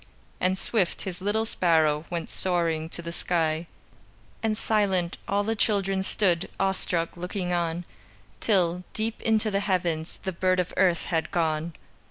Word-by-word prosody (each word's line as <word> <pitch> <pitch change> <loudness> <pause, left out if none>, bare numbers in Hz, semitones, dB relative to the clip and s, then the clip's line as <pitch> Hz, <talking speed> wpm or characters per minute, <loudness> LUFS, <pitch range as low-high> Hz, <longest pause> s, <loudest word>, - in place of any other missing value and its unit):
And 185 +1 +2
swift, 190 -3 0
His 185 -2 -5
little 210 +3 +1
sparrow 160 -6 +2
Went 170 -2 -3
soaring 165 -3 0
to 170 - -7
the 170 - -4
sky, 165 -1 0 0.7
And 220 -1 0
silent, 195 -6 +1
all 200 +1 +1
the 225 +2 0
children 195 -3 +1
Stood, 190 -2 +1
awestruck, 185 -3 0
looking 180 +1 -3
on, 170 0 -1 0.5
Till, 180 -4 +2
deep 220 +1 -2
into 220 -1 +2
the 200 - +2
heavens, 175 -5 -1
The 190 -1 -2
bird 185 +1 +2
of 180 - -1
earth 180 -3 +3
had 165 -2 0
gone. 160 -1 0
180 Hz, 150 wpm, -27 LUFS, 170-200 Hz, 0.7 s, earth